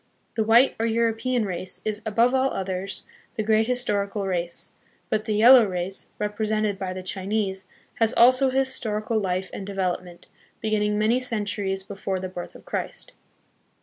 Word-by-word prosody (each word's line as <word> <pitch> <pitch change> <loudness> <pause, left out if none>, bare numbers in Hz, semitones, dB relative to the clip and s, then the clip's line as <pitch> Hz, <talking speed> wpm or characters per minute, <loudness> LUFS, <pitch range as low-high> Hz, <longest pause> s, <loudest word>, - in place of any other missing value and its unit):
The 225 - +1
white, 230 +4 +5
or 225 - +1
European, 230 +1 +1
race 185 -1 -4
is, 215 0 -2
above 230 +4 +3
all 265 0 +3
others, 190 0 -3 0.3
the 215 - -1
great 220 +1 +3
historical 205 -5 0
race; 175 -2 -2 0.4
but 215 0 0
the 215 -2 0
yel 230 +5 +8
low 250 -3 +8
race, 185 0 -3
represented 210 -1 -1
by 190 -1 -3
the 185 0 -6
Chinese, 190 0 -2 0.3
has 225 -1 +3
also 255 +3 +6
a 260 - -5
historical 225 -5 0
life 190 -1 -2
and - - -5
development, 185 -3 -3 0.3
beginning 210 -1 0
many 220 +4 +3
centuries 205 -5 -2
before 195 -1 -4
the 185 - -4
birth 180 -1 -7
of - - -14
Christ. - - -4
210 Hz, 160 wpm, -25 LUFS, 190-225 Hz, 0.4 s, yel